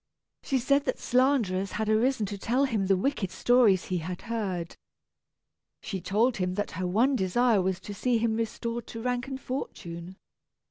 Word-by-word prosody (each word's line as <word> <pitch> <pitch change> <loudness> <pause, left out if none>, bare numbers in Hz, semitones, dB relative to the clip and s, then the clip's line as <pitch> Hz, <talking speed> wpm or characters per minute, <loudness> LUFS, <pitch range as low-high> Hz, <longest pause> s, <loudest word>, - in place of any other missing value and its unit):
She 270 - 0
said 280 +3 +2
that - - -1
slanderers 240 -8 +1
had 220 0 -2
arisen 220 +1 +2
to 200 +1 -5
tell 250 +7 +2
him 215 -7 -1
the 195 -1 +4
wicked 215 -2 -1
stories 205 0 +4
he 180 -1 -1
had 175 +2 -6
heard. 195 -7 -3 1.1
She 195 -4 -4
told 215 +7 +1
him 180 -1 -1
that 205 +1 -2
her 185 +1 -3
one 235 +9 +3
desire 220 +1 +2
was 185 0 -1
to 205 - -7
see 245 +3 +1
him 225 -1 +1
restored 230 +1 -3
to 225 - -7
rank 245 0 -1
and 265 -1 -5
fortune. 175 -10 -6
220 Hz, 175 wpm, -28 LUFS, 190-245 Hz, 1.1 s, the